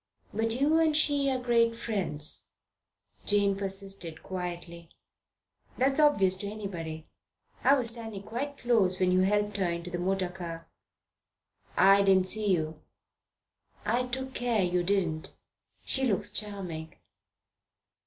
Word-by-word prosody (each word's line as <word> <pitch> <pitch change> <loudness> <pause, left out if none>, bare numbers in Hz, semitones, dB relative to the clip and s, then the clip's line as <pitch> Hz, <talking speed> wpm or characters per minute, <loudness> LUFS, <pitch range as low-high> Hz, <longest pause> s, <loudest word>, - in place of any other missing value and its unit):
"But 225 +3 0
you 305 +4 +4
and 315 -2 +3
she 285 -2 +2
are 260 - +1
great 235 -2 +2
friends," 185 -10 -1 0.8
Jane 200 -1 +3
persisted 195 -4 -1
quietly. 175 -2 -6 0.9
"That's 270 +3 +2
obvious 200 -12 +4
to 200 - -4
anybody. 170 -7 -6 0.6
I 275 - +6
was 240 -4 0
standing 225 -4 -7
quite 275 +7 -4
close 215 -7 +2
when 185 -1 +3
you 185 - +4
helped 205 +2 +1
her 190 -3 +1
into 170 +1 -4
the 175 - -3
motor 185 0 0
car." 170 -2 -7 1.1
"I 195 +1 +7
didn't 190 -2 +4
see 210 +2 -1
you." 160 -5 0 1.0
"I 250 +1 +1
took 260 +1 -5
care 240 -5 +1
you 180 0 +1
didn't. 175 -4 -1 0.5
She 265 -1 0
looks 195 - 0
charming." 185 -7 -5
195 Hz, 130 wpm, -29 LUFS, 180-235 Hz, 1.1 s, I